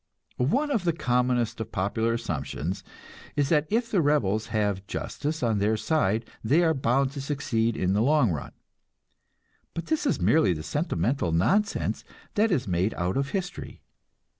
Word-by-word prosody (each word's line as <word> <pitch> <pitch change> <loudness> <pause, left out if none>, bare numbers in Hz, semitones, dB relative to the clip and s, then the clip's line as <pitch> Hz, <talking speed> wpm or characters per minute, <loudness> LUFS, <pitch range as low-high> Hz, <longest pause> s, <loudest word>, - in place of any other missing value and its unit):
One 265 - +1
of 225 -9 +1
the 170 -2 +2
commonest 125 -5 0
of 110 0 -6
popular 110 +4 0
assumptions 90 - -3 0.5
is 145 -2 +1
that 150 -1 +3
if 230 +2 0
the 190 - +3
rebels 115 -8 +1
have 105 -4 -1
justice 150 +5 -3
on 110 -3 +2
their 105 +2 +2
side, 115 -5 +1 0.2
they 145 +10 +3
are 160 -1 +3
bound 135 0 +1
to 140 -1 -6
succeed 115 -5 -1
in 95 +1 +1
the 105 - +2
long 140 -4 +3
run; 75 -4 -5 1.2
but 165 - -4
this 315 -2 0
is - - +1
merely 105 - +4
the 75 -2 -6
sentimental 125 - -1
nonsense 195 - +1 0.3
that 220 0 +2
is 130 -9 0
made 90 +4 0
out 90 +1 -1
of 140 +1 0
history. 190 +1 -5
125 Hz, 165 wpm, -27 LUFS, 105-155 Hz, 1.2 s, merely